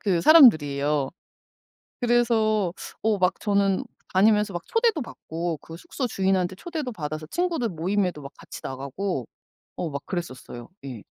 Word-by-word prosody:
그 185 -5 +1
사람들이에요. 150 - +5 0.9
그래서 225 -6 +2 0.3
어 220 -2 +2
막 185 0 +1
저는 200 -2 +1 0.3
다니면서 210 0 +4
막 175 - -3
초대도 455 - +1
받고 165 -7 -5
그 165 - -11
숙소 255 - -4
주인한테 190 -3 0
초대도 315 - -4
받아서 155 -3 -5
친구들 335 - -1
모임에도 180 -2 -1
막 140 - -9
같이 - - -10
나가고 140 - -4 0.5
어 170 - -3
막 140 -1 -4
그랬었어요. 130 -9 -6 0.2
예. 120 -6 -7
185 Hz, 310 characters per minute, -25 LUFS, 155-220 Hz, 0.9 s, 사람들이에요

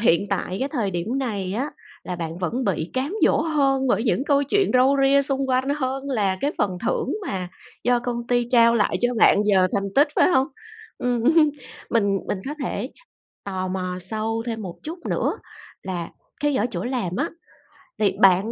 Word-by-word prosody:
hiện 200 -4 +3
tại 185 -1 -1
cái 270 - 0
thời 235 -10 -1
điểm 190 +9 -2
này 205 -8 -2
á 265 +8 -2 0.3
là 180 - -4
bạn 165 0 -5
vẫn 235 +8 -2
bị 170 -3 -1
cám 275 +9 -2
dỗ - - +4
hơn 275 -4 +1
bởi 230 - +2
những 255 +2 +1
câu 285 -1 +3
chuyện 390 +8 +1
râu 260 +2 +5
ria 280 +1 +5
xung 270 -1 -1
quanh 260 +1 +1
hơn 265 0 -2
là 200 -7 +1
cái 290 - 0
phần 185 -3 0
thưởng - - 0
mà 185 -2 -3 0.4
do 245 +1 +3
công 240 -1 -4
ty 245 -1 +1
trao 235 -2 +6
lại 215 -3 +2
cho 245 0 +1
bạn 220 - +5
giờ 190 -3 +4
thành 195 -1 -2
tích, 290 +2 +5
phải - - +5
hông? 270 -7 +3 0.5
Ừm, 245 -2 0 0.7
mình 200 -4 +2
mình 205 - -1
có 295 - -3
thể 240 +3 -3 0.5
tò 185 -2 -3
mò 185 -1 -3
sâu 220 +4 -3
thêm 225 -2 -3
một 180 -4 -6
chút 330 +3 -6
nữa - - 0 0.5
là 175 -3 -4 0.3
cái 295 -1 +1
ở 225 - +1
chỗ 175 0 -3
làm 240 -8 -2
á, - - 0 0.7
thì 200 -3 +2
bạn 195 +2 +5
230 Hz, 195 wpm, -23 LUFS, 190-265 Hz, 0.7 s, trao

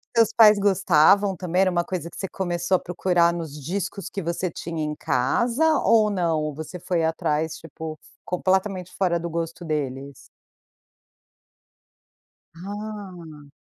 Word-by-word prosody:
Seus 225 -1 +4
pais 215 -2 +7
gostavam 195 0 +4
também? 180 +1 0
Era 185 -1 +3
uma 175 -1 +1
coisa 170 -2 -4
que - - -13
você 195 - -3
começou 175 0 -1
a - - +2
procurar 175 -1 +1
nos 165 -4 -5
discos 190 +5 -4
que 195 - -4
você 170 +2 -2
tinha 165 -1 -5
em 150 0 -3
casa 240 - +1
ou 215 -2 +4
não, 170 -5 0
ou 150 -1 -3
você 160 +3 -7
foi 170 -1 -1
atrás 160 -1 -1
tipo, 160 -1 -8 0.3
completamente 185 0 0
fora 175 -3 +1
do 170 0 -4
gosto 165 +1 -4
deles? 140 -2 -3 2.4
Ah. 185 -6 -8
175 Hz, 140 wpm, -24 LUFS, 160-195 Hz, 2.4 s, pais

